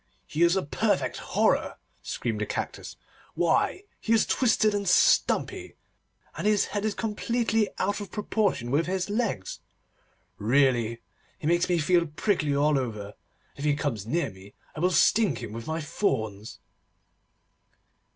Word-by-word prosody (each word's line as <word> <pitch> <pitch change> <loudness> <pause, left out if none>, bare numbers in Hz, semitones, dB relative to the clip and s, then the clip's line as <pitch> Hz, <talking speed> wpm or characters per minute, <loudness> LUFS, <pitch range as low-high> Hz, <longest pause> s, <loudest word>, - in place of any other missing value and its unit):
'He 155 - -4
is 170 +1 +5
a 190 - 0
perfect 145 - 0
horror!' - - 0 0.2
screamed 110 -3 -3
the 105 - -1
Cactus. - - -5 0.4
'Why, 175 - +1 0.2
he 230 - 0
is 225 - +4
twisted 220 -4 +2
and 200 -2 -1
stumpy, - - +2 0.6
and - - -2
his 210 -1 +3
head 205 0 -1
is 215 - -1
completely 225 -1 0
out 205 +2 -1
of 200 - -7
proportion 205 - -1
with 155 +5 +1
his 190 +1 -2
legs. 205 - -2 0.8
Really 120 -1 +2 0.4
he - - -9
makes 175 +3 +2
me 175 - +3
feel 170 +1 +2
prickly 155 -2 0
all 145 0 +3
over, 105 -6 -4
and - - -13 0.4
if 140 - -7
he 150 -1 +2
comes 115 -9 -3
near 170 +7 0
me 95 +2 -15 0.2
I - - -6
will 180 +3 +3
sting 190 - +3
him 105 - -7
with 115 0 -7
my 160 +1 -2
thorns. 110 - -2
165 Hz, 150 wpm, -27 LUFS, 120-205 Hz, 0.8 s, is